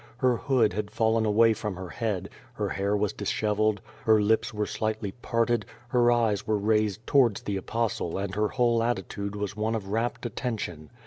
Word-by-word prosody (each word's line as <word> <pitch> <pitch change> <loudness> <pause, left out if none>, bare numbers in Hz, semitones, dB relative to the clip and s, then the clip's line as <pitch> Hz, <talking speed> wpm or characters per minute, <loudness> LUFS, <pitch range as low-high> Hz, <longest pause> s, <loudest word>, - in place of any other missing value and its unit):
Her 125 -1 +3
hood 120 -8 +2
had 105 +1 -3
fallen 110 0 +1
away 110 +2 +5
from 105 -2 -4
her 90 0 -7
head, 105 -5 -2 0.2
her - - -2
hair 100 +1 0
was 105 -1 0
dishevelled, 105 0 0 0.2
her 110 -1 +5
lips 110 +2 +2
were 105 -1 -1
slightly 110 -2 -2
parted, 115 0 0 0.3
her 120 0 +4
eyes 110 -4 +1
were 110 -1 +2
raised 105 +1 +1
towards 125 -7 +3
the 100 - -2
Apostle 105 -4 -2
and 95 -1 -3
her 105 +1 +1
whole 120 -1 +2
attitude 100 -3 -2
was 105 -1 -3
one 110 +2 -1
of 100 -3 -4
rapt 115 +3 -1
attention. 100 - -4
110 Hz, 180 wpm, -27 LUFS, 100-115 Hz, 0.3 s, away